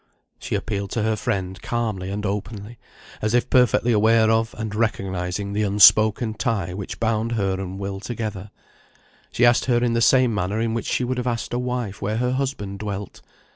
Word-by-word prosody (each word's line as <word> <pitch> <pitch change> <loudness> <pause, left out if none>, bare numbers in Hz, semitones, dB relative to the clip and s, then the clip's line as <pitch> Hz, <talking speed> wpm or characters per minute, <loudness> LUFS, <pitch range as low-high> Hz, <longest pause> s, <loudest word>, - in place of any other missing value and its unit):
She - - -3
appealed 100 -2 -3
to 110 - -1
her 110 0 +1
friend 95 -2 -3
calmly 110 -6 -2
and 105 +2 -4
openly, 105 +2 -5 0.4
as 110 +2 0
if 120 - +1
perfectly 125 -1 +3
aware 110 +1 +4
of, 115 0 0
and 110 -1 -4
recognising 100 -3 -2
the 105 - 0
unspoken 110 +2 +5
tie 105 -7 -2
which 95 0 -6
bound 115 0 0
her 100 -4 0
and 95 0 -6
Will 100 0 -4
together; 105 -2 -5 0.8
she 120 - +3
asked 120 0 +4
her 125 -2 +2
in 120 -1 +1
the 115 - +1
same 125 -1 +4
manner 105 +1 -1
in 115 0 0
which 115 - -3
she - - 0
would 125 +1 -2
have 125 - -3
asked 115 -1 -3
a 120 - 0
wife 125 -5 -3
where 105 +2 -1
her 125 +1 0
husband 130 -7 -3
dwelt. 100 -1 -6
110 Hz, 190 wpm, -23 LUFS, 100-120 Hz, 0.8 s, unspoken